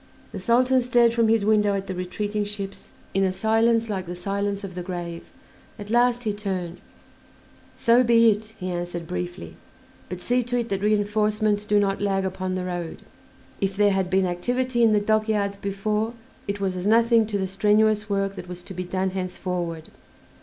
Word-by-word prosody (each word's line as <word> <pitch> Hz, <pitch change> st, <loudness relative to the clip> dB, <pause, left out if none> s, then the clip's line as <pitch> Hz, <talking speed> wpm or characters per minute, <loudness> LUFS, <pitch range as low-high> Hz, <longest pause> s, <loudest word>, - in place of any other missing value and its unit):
The -, -, -6 dB
Sultan 255 Hz, +2 st, +3 dB
stared 240 Hz, -1 st, +3 dB
from 230 Hz, -1 st, +3 dB
his 220 Hz, -2 st, +2 dB
window 210 Hz, -1 st, +3 dB
at 195 Hz, 0 st, -3 dB
the 190 Hz, -, -4 dB
retreating 205 Hz, +4 st, -2 dB
ships 200 Hz, -1 st, -6 dB, 0.2 s
in 195 Hz, -, +2 dB
a 190 Hz, -, +2 dB
silence 225 Hz, +3 st, +2 dB
like 190 Hz, -4 st, -3 dB
the 175 Hz, -, -5 dB
silence 200 Hz, +2 st, -2 dB
of 195 Hz, -2 st, -6 dB
the 180 Hz, -, -5 dB
grave. 175 Hz, -2 st, -5 dB, 0.5 s
At 205 Hz, -1 st, -8 dB
last 245 Hz, +1 st, +3 dB
he 215 Hz, -3 st, -1 dB
turned: 185 Hz, -4 st, -4 dB, 1.0 s
"So 235 Hz, +2 st, +4 dB
be 230 Hz, -1 st, +5 dB
it," 215 Hz, +1 st, -5 dB
he 185 Hz, -1 st, -3 dB
answered 175 Hz, -1 st, -4 dB
briefly; 175 Hz, -, -6 dB, 0.5 s
"but 180 Hz, -, -5 dB
see 245 Hz, +6 st, +1 dB
to 245 Hz, +1 st, -2 dB
it 235 Hz, -1 st, -2 dB
that 195 Hz, -1 st, -2 dB
reinforcements 210 Hz, 0 st, +1 dB
do 210 Hz, 0 st, +3 dB
not 195 Hz, -1 st, 0 dB
lag 195 Hz, -1 st, 0 dB
upon 185 Hz, 0 st, -3 dB
the 185 Hz, -1 st, -3 dB
road." 175 Hz, -2 st, -5 dB, 0.6 s
If 195 Hz, -1 st, 0 dB
there 205 Hz, -1 st, +4 dB
had 190 Hz, -2 st, 0 dB
been 190 Hz, 0 st, +2 dB
activity 245 Hz, +8 st, -1 dB
in 230 Hz, -2 st, +5 dB
the 210 Hz, -, +4 dB
dockyards 215 Hz, -1 st, +1 dB
before 210 Hz, +3 st, -2 dB, 0.3 s
it 200 Hz, 0 st, -2 dB
was 190 Hz, -2 st, -1 dB
as 180 Hz, +2 st, -3 dB
nothing 230 Hz, 0 st, +4 dB
to 210 Hz, -2 st, -1 dB
the 190 Hz, -, -1 dB
strenuous 210 Hz, +2 st, +2 dB
work 195 Hz, -1 st, -1 dB
that 180 Hz, -, -8 dB
was 180 Hz, 0 st, -7 dB
to 190 Hz, -, -9 dB
be 180 Hz, 0 st, -4 dB
done 190 Hz, +1 st, -1 dB
henceforward. 180 Hz, -3 st, -4 dB
200 Hz, 190 wpm, -24 LUFS, 185-220 Hz, 1.0 s, be